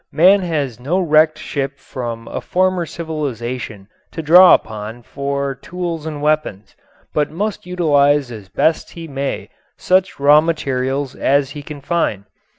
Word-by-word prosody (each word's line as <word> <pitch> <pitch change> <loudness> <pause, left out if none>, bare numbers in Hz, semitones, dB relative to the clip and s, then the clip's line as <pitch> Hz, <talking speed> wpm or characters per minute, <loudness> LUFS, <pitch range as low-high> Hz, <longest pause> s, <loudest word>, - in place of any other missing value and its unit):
Man 185 +7 +5
has 145 -9 -2
no 145 +9 -1
wrecked 155 -2 +3
ship 135 -1 -4
from 120 -3 -6
a - - -5
former 185 -2 0
civilization 125 -10 -5 0.2
to 160 - -6
draw 180 +4 +8
upon 110 +2 -6
for 140 +1 -3
tools 165 +3 -5
and 150 -2 -5
weapons, 150 -10 -1 0.4
but 150 -1 +1
must 200 +2 -4
utilize 145 -6 +2
as 105 -5 -10
best 160 - 0
he 165 -1 -8
may 140 -1 -4 0.3
such 185 -2 +1
raw 145 +2 +6
materials 135 -4 -2
as 140 0 +1
he 150 - -7
can 145 0 -9
find. 140 - -1
145 Hz, 145 wpm, -18 LUFS, 130-165 Hz, 0.4 s, draw